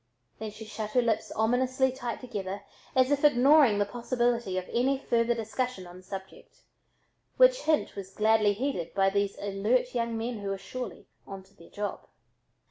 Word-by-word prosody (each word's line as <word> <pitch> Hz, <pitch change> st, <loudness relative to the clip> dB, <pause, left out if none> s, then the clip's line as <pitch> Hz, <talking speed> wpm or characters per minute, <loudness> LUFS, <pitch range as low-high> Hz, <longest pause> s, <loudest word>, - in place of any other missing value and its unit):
Then 220 Hz, -, -4 dB
she 215 Hz, +1 st, -10 dB
shut 215 Hz, 0 st, -5 dB
her 250 Hz, -, +4 dB
lips 220 Hz, -2 st, 0 dB
ominously 255 Hz, +4 st, +2 dB
tight 245 Hz, -2 st, -5 dB
together 200 Hz, -5 st, -5 dB, 0.3 s
as 260 Hz, +1 st, +4 dB
if 285 Hz, 0 st, +1 dB
ignoring 275 Hz, -4 st, +6 dB
the 205 Hz, -, +2 dB
possibility 240 Hz, -2 st, -1 dB
of 185 Hz, -, -3 dB
any 265 Hz, +3 st, +2 dB
further 235 Hz, -2 st, +1 dB
discussion 230 Hz, -2 st, -3 dB
on 175 Hz, 0 st, -11 dB
the -, -, -13 dB
subject, 190 Hz, +1 st, -10 dB, 0.7 s
which -, -, +6 dB
hint 305 Hz, -10 st, +1 dB
was 195 Hz, -2 st, -7 dB
gladly 215 Hz, 0 st, +3 dB
heeded 205 Hz, -, -3 dB
by 195 Hz, 0 st, +3 dB
these 200 Hz, 0 st, 0 dB
alert 205 Hz, +6 st, 0 dB
young 230 Hz, -2 st, -1 dB
men 230 Hz, 0 st, -3 dB
who 200 Hz, -1 st, -4 dB
were 195 Hz, -, -2 dB
surely 250 Hz, +6 st, -7 dB, 0.2 s
"onto 195 Hz, 0 st, -10 dB
their 170 Hz, -3 st, -17 dB
job." 205 Hz, 0 st, -5 dB
225 Hz, 170 wpm, -28 LUFS, 200-250 Hz, 0.7 s, ignoring